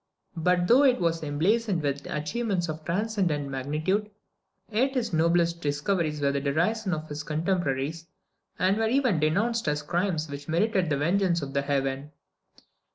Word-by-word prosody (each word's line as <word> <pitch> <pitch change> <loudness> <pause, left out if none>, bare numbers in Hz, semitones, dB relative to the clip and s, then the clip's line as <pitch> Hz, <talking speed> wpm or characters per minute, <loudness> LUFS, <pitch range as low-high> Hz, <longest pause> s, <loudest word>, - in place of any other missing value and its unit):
But 175 +2 +2
though 250 +7 +6
it 260 -3 +4
was 165 -2 0
emblazoned 175 +5 0
with 140 0 -2
achievements 175 +4 -1
of 155 0 -5
transcendent 175 -6 -1
magnitude, 155 +10 -1 0.6
yet 260 +6 +1
his 235 -6 -1
noblest 170 +1 +2
discoveries 150 +1 -1
were 140 -1 +2
the 140 0 -1
derision 180 +9 0
of 155 0 -7
his 150 0 -5
contemporaries, 160 -1 -1 0.5
and 190 +3 +2
were 225 0 +1
even 250 - +2
denounced 210 +10 +1
as 150 0 0
crimes 175 -3 -1
which 140 0 -8
merited 185 +1 +1
the 145 - +1
vengeance 170 +2 +1
of 135 0 -6
Heaven. 140 0 -1
165 Hz, 150 wpm, -27 LUFS, 150-200 Hz, 0.6 s, though